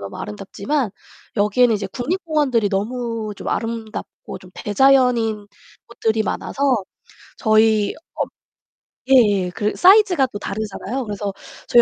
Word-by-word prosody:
너무 100 0 -7
아름답지만 200 - -3 0.5
여기에는 220 +3 +3
이제 205 - -2
국립공원들이 290 - 0
너무 225 +1 -2
좀 - - -6
아름답고 225 -1 -5
좀 185 - -16
대자연인 230 -2 +2 0.4
곳들이 225 -2 -1
많아서 275 - -4 0.8
저희 215 -2 +3 0.2
어 - - 0 0.9
예예. 205 -8 +4
그 210 -1 -1
사이즈가 370 -7 +5
또 - - -5
다르잖아요. 215 +5 -4
그래서 205 -1 -4 0.3
저희 240 - +6
225 Hz, 295 characters per minute, -20 LUFS, 205-255 Hz, 0.9 s, 저희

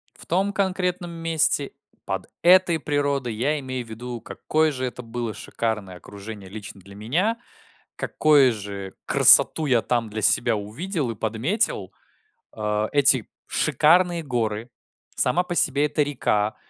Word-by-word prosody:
В - - -12
том 195 +4 0
конкретном 180 -3 -1
месте, 165 -4 0 0.3
под - - -4
этой 175 -2 +5
природой, 140 -5 -1
я 145 +6 0
имею 130 -2 -5
в - - -15
виду, 120 +1 -7
какое 155 0 0
же 130 -1 -3
это 125 0 -6
было 115 -1 -4
шикарное 110 -4 -4
окружение 100 0 -10
лично 100 -1 -9
для 100 +2 -14
меня, 175 - 0 0.6
какое 145 -5 +4
же 100 -2 -7
красоту 160 - +5
я 125 -5 +3
там 120 -3 -1
для 110 +1 -5
себя 115 +2 +3
увидел 125 - -3
и - - -7
подметил. 110 - -1 0.6
А. 105 0 -2
Эти 135 -5 +4 0.2
шикарные 175 +1 +3
горы, 115 -3 -2 0.5
сама 170 +8 +1
по 175 -1 -5
себе 145 -1 +3
эта 150 0 +1
река. 110 -7 -1
125 Hz, 140 wpm, -23 LUFS, 110-160 Hz, 0.6 s, этой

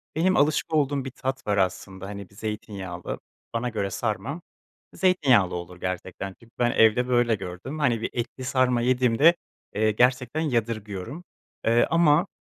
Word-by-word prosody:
Benim 180 +4 +3
alışık 150 +2 +2
olduğum 140 -3 +1
bir 135 - -5
tat 130 +1 -4
var 100 -1 +1
aslında, 95 0 -1
hani, 100 -2 -7
bir 100 - -21
zeytinyağlı, 100 -4 -5 0.3
bana 115 +1 -1
göre 100 -4 -2
sarma, 120 - -3 0.5
e, - - -14
zeytinyağlı 135 - +3
olur 90 +1 -7
gerçekten, 95 +1 -4
çünkü 115 0 -20
ben 120 -1 +3
evde 115 +3 +4
böyle 120 -2 +3
gördüm. 95 - -7
Hani 120 -6 +2
bir - - -2
etli 120 +2 -4
sarma 130 -2 +2
yediğimde, 130 +6 +4 0.4
eee, 110 +1 +3
gerçekten 125 +6 +2
yadırgıyorum, 115 - -2 0.4
ııı, 115 +1 +4
ama, 165 +1 +4
120 Hz, 155 wpm, -25 LUFS, 100-135 Hz, 0.5 s, evde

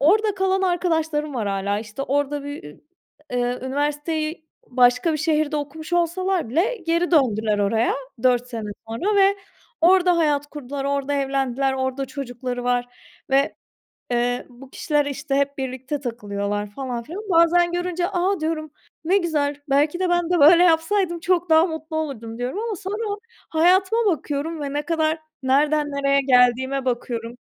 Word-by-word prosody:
orada 415 +8 +3
kalan 385 0 +1
arkadaşlarım 320 -5 0
var 225 -4 -2
hâlâ, 200 +1 -1
işte, 215 +4 -6
orada 285 +1 -1
bir 285 - -7
ü 150 - -12 0.5
eee, 245 0 0
üniversiteyi 300 +4 -2 0.2
başka 250 +5 +3
bir 305 - -1
şehirde 310 -1 +1
okumuş 310 +3 -6
olsalar 350 -2 0
bile 355 - +1
geri 335 +1 +1
döndüler 220 -9 +2
oraya 215 +3 +1 0.3
4 245 -1 +3
sene 225 -4 -5 0.2
sonra 370 - -1
ve 395 0 +5 0.4
orada 360 +1 +5
hayat 295 -3 +1
kurdular, 285 -1 -6
orada 280 0 -1
evlendiler, 270 -1 0
orada 265 +1 -2
çocukları 250 -2 -5
var 245 0 +1 0.4
ve, 275 +1 +2 0.6
eee, 245 +1 0
bu 255 +2 -14
kişiler, 295 +1 0
işte, 285 0 -3
hep 280 0 0
birlikte 265 +2 -4
takılıyorlar 205 -4 -3
falan 245 0 -4
filan. 345 - -7
Bazen 345 0 +4
görünce, 355 0 -1
"A!", 375 0 0
diyorum, 310 -1 -3 0.3
"Ne 375 +4 +4
güzel. 300 -6 0
Belki 295 +5 +2
de 370 -1 +1
ben 350 -1 +1
de 355 -1 +2
böyle 335 +4 +7
yapsaydım 345 +1 +2
çok 355 0 0
daha 320 +1 +6
mutlu 320 -1 -6
olurdum." 230 -8 -5
diyorum 250 - -3
ama 455 -2 -3
sonra 410 +2 -3 0.3
hayatıma 375 +7 +3
bakıyorum 315 -2 -1
ve 280 -1 -4
ne 295 - 0
kadar 315 +1 0 0.2
nereden 295 +3 +2
nereye 280 0 +2
geldiğime 260 +1 +3
bakıyorum, 235 -1 -3
290 Hz, 155 wpm, -22 LUFS, 255-340 Hz, 0.6 s, böyle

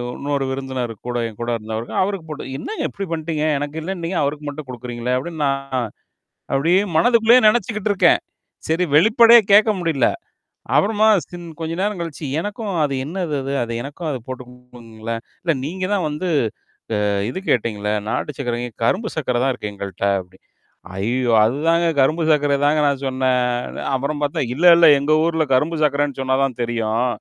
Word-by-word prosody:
இன்னொரு 140 -1 -2
விருந்தினரு 130 -3 -4
கூட 120 0 -2
என் 110 - -15
கூட 120 - -2
இருந்தவருக்கு. 110 +1 -6
அவருக்கு 190 -4 -4
போட்டு 145 -3 -6
என்னங்க 435 - -4
இப்டி 195 - -5
பண்ணிட்டீங்க? 160 -1 -2
எனக்கு 145 +2 -4
இல்லன்னு 180 0 -5
நீங்க 175 +1 -1
அவருக்கு 145 +1 -3
மட்டும் 145 -1 -8
குடுக்குறீங்களேன்! 125 0 -3
அப்பிடின்னு 155 +3 -4
நான் 135 0 -2 0.9
அப்படியே 165 +8 +3 0.2
மனதுக்குள்ளயே 230 +5 +5
நெனச்சுக்கிட்டுருக்கேன். 210 -4 +2 0.5
சரி 165 +3 +2
வெளிப்படையா 230 +6 +7
கேட்க 215 +2 +6
முடியல. 155 -8 +2 0.7
அப்புறமா 215 +1 +3 0.2
சின் 175 -1 -9
கொஞ்ச 160 0 -3
நேரம் 205 -1 -1
கழிச்சு. 165 -2 -6
எனக்கும் 205 +3 -4
அது 145 -2 0
என்னது 170 -1 -3
அது? 135 +1 -3
அத 115 - -6
எனக்கும் 145 +6 -6
அது 135 - -2
போட்டு 130 -1 -6
குடுங்களேன்? 115 -2 -8 0.2
இல்ல 170 -2 +2
நீங்க 185 +5 -3
தான் 190 -5 0
வந்து 150 +5 -4 0.8
அ - - +1 0.2
இது 130 - -4
கேட்டீங்களே! 105 -3 0 0.2
நாட்டு 150 +5 -3
சர்க்கர 120 -3 -2
ஏன் 110 - -27
கரும்பு 215 - 0
சர்க்கர 125 -5 0
தான் 135 - +2
இருக்கு 105 -4 -6
எங்கள்ட்ட 100 -1 -5
அப்படின்னு. 90 0 -14 0.5
ஐயோ! 120 +5 0
அதுதாங்க 160 +9 +2
கரும்பு 155 +5 +2
சர்க்கர 145 -2 +2
தாங்க 150 +1 +3
நான் 140 -1 -1
சொன்னேன். 125 -2 0 0.2
அப்புறம் 140 +3 -2
பார்த்தேன் 145 -3 -1
இல்ல, 165 +6 0
இல்ல 170 -1 +7
எங்க 140 +2 -1
ஊர்ல 160 -1 +1
கரும்பு 150 +6 +1
சர்க்கரன்னு 145 -2 0
சொன்னா 130 0 +1
தான் 130 -3 -2
தெரியும். 115 0 0
145 Hz, 165 wpm, -20 LUFS, 125-170 Hz, 0.9 s, வெளிப்படையா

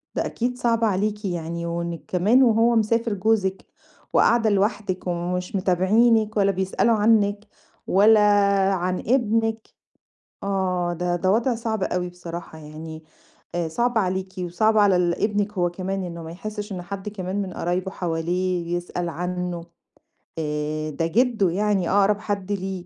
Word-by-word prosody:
ده - - 0
أكيد 245 +1 -2
صعبة 230 -2 +1
عليكِ 210 +2 -1
يعني، 170 -2 -3
وإنِّك 170 0 -4
كمان 210 +9 +4
وهو 230 0 +4
مسافر 230 +1 +1
جوزِك 195 -1 0 0.5
وقاعدة 230 -2 +4
لوحدِك 200 -2 -1
ومش 180 +2 -2
متابعينِك 215 +4 +3
ولا 200 -1 +3
بيسألوا 190 +5 +1
عنِّك 210 -1 +2 0.4
ولا 210 +3 +5 0.5
عن 185 0 -1
ابنِك 225 -2 0 0.8
آه، 185 -3 -1
ده 175 +1 -1
ده 185 +2 +1
وضع 235 +3 +2
صعب 225 -3 -3
أوي 180 -1 -1
بصراحة 170 -2 -8
يعني. 155 +1 -9 0.5
آآ 175 -1 -1
صعب 240 +8 0
عليكِ، 190 -1 -1
وصعب 180 +5 +1
على 205 -3 +5
ال 175 -1 +1
ابنِك 210 -1 0
هو 175 -3 +1
كمان، 190 +2 -4
إنه 170 -2 -6
ما 160 - -8
يحسّش 210 +4 -6
إن 185 -2 -4
حد 195 +3 -6
كمان 195 -1 -3
من 190 -2 -5
قرايبه 180 +3 -2
حواليه 175 0 -2
يسأل 175 0 -4
عنه، 180 0 -4 0.7
آآ، 155 0 -2
ده 160 +2 -2
جِدّه 220 0 +2
يعني 195 0 0
أقرب 200 +1 +3
حد 205 -2 -3
ليه. 190 -2 -3
190 Hz, 145 wpm, -23 LUFS, 175-215 Hz, 0.8 s, ولا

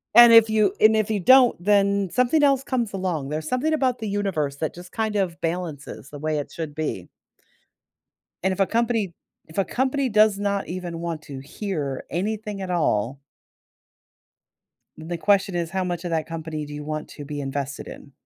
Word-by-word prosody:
And 240 -1 +10
if 225 -1 +8
you 210 -3 +3
and 220 0 +6
if 215 0 +1
you 205 - 0
don't, 250 -1 +6
then 200 -1 +3
something 255 +5 +2
else 275 -2 +3
comes 235 -6 -2
along. 175 -7 -2
There's 155 +1 -4
something 290 +5 0
about 260 -5 +1
the 220 -2 -4
universe 185 -9 -1
that 155 - -2
just 180 +1 -12
kind 220 -2 -2
of 180 -3 -1
balances 165 -5 -4
the 145 - -9
way 155 0 -1
it 145 - -6
should 160 -3 -5
be. 145 - -4 1.4
And 190 - +2
if 185 - -8
a 195 - +4
company 225 -6 0 0.3
if 160 - -14
a 195 - +2
company 265 +1 0
does 215 -1 +4
not 200 -1 -1
even 175 -2 -5
want 165 -3 -4
to 135 -2 -8
hear 145 -2 -4
anything 205 +3 -3
at 185 - -5
all 135 -6 0 1.8
the 165 +2 -5
question 195 0 +2
is 170 -2 -1
how 190 -1 -1
much 175 -1 -3
of 175 - -3
that 160 -1 0
company 160 -2 -5
do 145 - -9
you 150 0 -6
want 155 0 -4
to 145 - -9
be 145 0 -5
invested 140 +1 -4
in? 140 - -11
185 Hz, 190 wpm, -24 LUFS, 155-215 Hz, 1.8 s, And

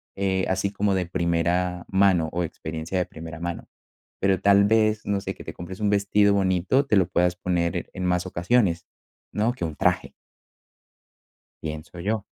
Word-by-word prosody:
Eh, 95 -1 0
así 95 +1 0
como 100 0 0
de 95 -2 0
primera 90 +1 0
mano 95 -5 +3
o 90 +1 -1
experiencia 80 +2 -5
de 90 - +1
primera 80 -1 -9
mano. 85 0 -5 0.5
Pero 95 -1 +2
tal 100 0 +5
vez, 110 0 +2
no 100 -1 0
sé, - - -5
que - - -12
te - - -6
compres 95 +3 -8
un 105 -1 +1
vestido 100 0 +3
bonito, 95 +8 +2
te 105 - +2
lo 95 -3 +4
puedas 90 0 +1
poner 85 -2 -1
en 90 - -5
más 90 0 +1
ocasiones, 90 -1 +1 0.5
¿no? 110 +3 +1
Que 90 - -5
un 80 -2 -4
traje - - +1 1.5
pienso 80 +2 -7
yo. 105 +2 -2
95 Hz, 170 wpm, -25 LUFS, 85-100 Hz, 1.5 s, tal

